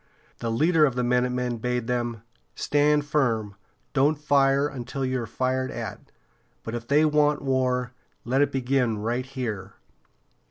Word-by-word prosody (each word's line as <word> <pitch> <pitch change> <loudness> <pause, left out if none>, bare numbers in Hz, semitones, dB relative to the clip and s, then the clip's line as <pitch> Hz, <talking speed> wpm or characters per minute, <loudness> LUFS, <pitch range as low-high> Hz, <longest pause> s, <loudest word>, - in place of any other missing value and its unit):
The 115 - -2
leader 155 +8 +3
of 130 - -3
the 125 - 0
minutemen 125 0 0
bade 125 0 -1
them 120 -2 -2 0.3
"Stand 150 0 +2
firm! 115 -9 0 0.4
Don't 145 +2 +3
fire 140 -1 +3
until 135 -1 -4
you 130 -1 -1
are 115 - -5
fired 130 +3 -1
at. 115 -4 -7 0.5
But 115 - -6
if 120 0 -5
they 150 +2 +4
want 150 -1 +2
war, 130 -2 0 0.3
let 130 +4 +2
it 145 - +2
begin 130 -3 +1
right 120 +5 -2
here." 110 -8 -5
130 Hz, 150 wpm, -25 LUFS, 120-140 Hz, 0.5 s, they